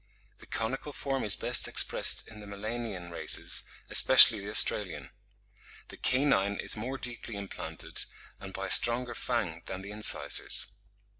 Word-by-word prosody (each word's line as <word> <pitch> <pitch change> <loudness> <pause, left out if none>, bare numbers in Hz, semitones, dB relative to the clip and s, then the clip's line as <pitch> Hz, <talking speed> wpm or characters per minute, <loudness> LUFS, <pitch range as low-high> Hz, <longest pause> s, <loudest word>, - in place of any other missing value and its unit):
The - - -16
conical 135 +6 -4
form 135 -1 -3
is 105 - +3
best - - +2
expressed - - +3
in 110 - -13
the 105 - -12
Melanian 100 -3 -6
races, 85 - +1 0.2
especially 110 - +7
the 100 +1 -8
Australian. 105 -4 +1 0.8
The - - -12
canine 130 -7 +1
is - - -2
more 125 +5 -5
deeply 120 -3 -6
implanted, 100 -1 -4 0.3
and 95 - -9
by 95 0 -6
a 95 - -5
stronger 120 +1 +2
fang 100 -10 -3
than 95 0 -7
the 100 - -9
incisors." 105 -9 -1
105 Hz, 145 wpm, -29 LUFS, 95-120 Hz, 0.8 s, especially